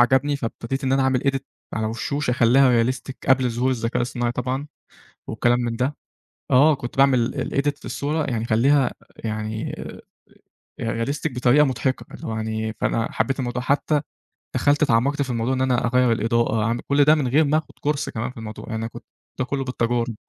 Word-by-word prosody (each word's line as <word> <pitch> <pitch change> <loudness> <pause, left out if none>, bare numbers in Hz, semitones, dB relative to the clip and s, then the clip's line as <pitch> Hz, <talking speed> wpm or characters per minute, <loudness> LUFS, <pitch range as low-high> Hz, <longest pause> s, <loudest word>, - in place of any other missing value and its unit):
عجبني 130 +4 +3
فابتديت 130 +1 -4
إن 130 - +1
أنا 135 0 +3
أعمل 130 -1 +2
edit 135 -1 0 0.3
على 110 -1 -1
وشوش 130 +6 -2
اخليها 125 0 +4
realistic 130 +2 -3 0.2
قبل 130 -1 +4
ظهور 120 +3 0
الذكاء 115 -1 -1
الصناعي 120 0 -1
طبعًا 130 +3 -3 0.6
وكلام 120 +1 +1
من 120 -1 -2
ده. 130 +5 -1 0.6
آه 145 +4 +6
كنت 120 -1 -7
باعمل 130 -3 +4 0.2
الedit 140 +1 +1
للصورة 150 +2 -2
يعني 115 -4 -2
أخلّيها 130 +4 +3 0.2
يعني 110 0 -4 1.1
آآ 115 0 -1
realistic 140 +2 -2
بطريقة 125 +4 +4
مضحكة 130 0 -1
فاللي - - -8
هو 110 - -3
يعني، 110 0 -3
فأنا 115 0 0
حبّيت 135 0 -1
الموضوع 125 -1 -2
حتّى 145 +3 +1 0.5
دخلت 145 +1 +3
تعمقت 140 +2 +2
في 135 - -2
الموضوع 120 +1 0
إن 130 - -1
أنا 130 -2 +1
أغير 125 0 +3
الإضاءة، 115 -1 +1
أعمل 115 +2 0
كل 140 +1 +4
ده 150 +2 +6
من 145 -4 0
غير 145 +6 +4
ما 150 +2 +2
اخد 160 - -6
كورس 145 -1 -1
كمان 120 +3 -4
في - - -18
الموضوع 110 -1 -7
يعني 110 0 -3
كنت - - -11 0.4
ده 130 - +1
كلّه 135 +1 -2
بالتجارب. 120 -2 -1
125 Hz, 180 wpm, -23 LUFS, 115-140 Hz, 1.1 s, آه